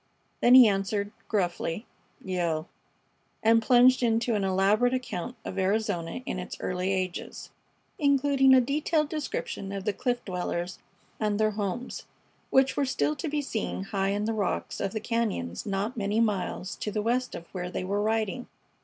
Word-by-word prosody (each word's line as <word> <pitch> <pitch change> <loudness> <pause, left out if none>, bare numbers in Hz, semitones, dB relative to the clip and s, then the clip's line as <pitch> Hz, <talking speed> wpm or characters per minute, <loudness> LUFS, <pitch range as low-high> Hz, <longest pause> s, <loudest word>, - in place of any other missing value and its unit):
Then 245 +1 +7
he 255 -3 +10
answered, 200 +1 0 0.2
gruffly, 180 0 -1 0.4
"Yale," 170 -4 -1 0.8
and 225 +1 +5
plunged 250 +2 +5
into 230 0 +2
an 205 -2 0
elaborate 200 +6 +3
account 245 -2 -4
of 195 - -4
Arizona 190 0 -1
in 185 - -3
its 180 - -6
early 180 +1 -1
ages, 185 -2 -4 0.5
including 275 -2 +4
a 255 - +6
detailed 300 +3 0
description 285 -10 -4
of 195 -1 -5
the 210 - +1
cliff 245 +4 -2
dwellers 180 -1 -3 0.4
and 210 -1 0
their 215 0 +3
homes, 210 +4 -4 0.4
which 265 0 +3
were 285 - +1
still 150 - 0
to - - -3
be 295 0 -1
seen 220 -6 -3
high 195 -1 -1
in 205 +1 -1
the 225 - 0
rocks 210 -3 -2
of 195 - -1
the 220 - -1
cañons 215 - -2
not 200 +5 -2
many 210 0 0
miles 200 -4 -1
to - - -3
the 210 0 -2
west 250 +3 0
of 170 - -8
where 180 -1 -4
they 185 - -3
were 200 +2 -1
riding. 220 +2 -1
210 Hz, 165 wpm, -28 LUFS, 190-245 Hz, 0.8 s, he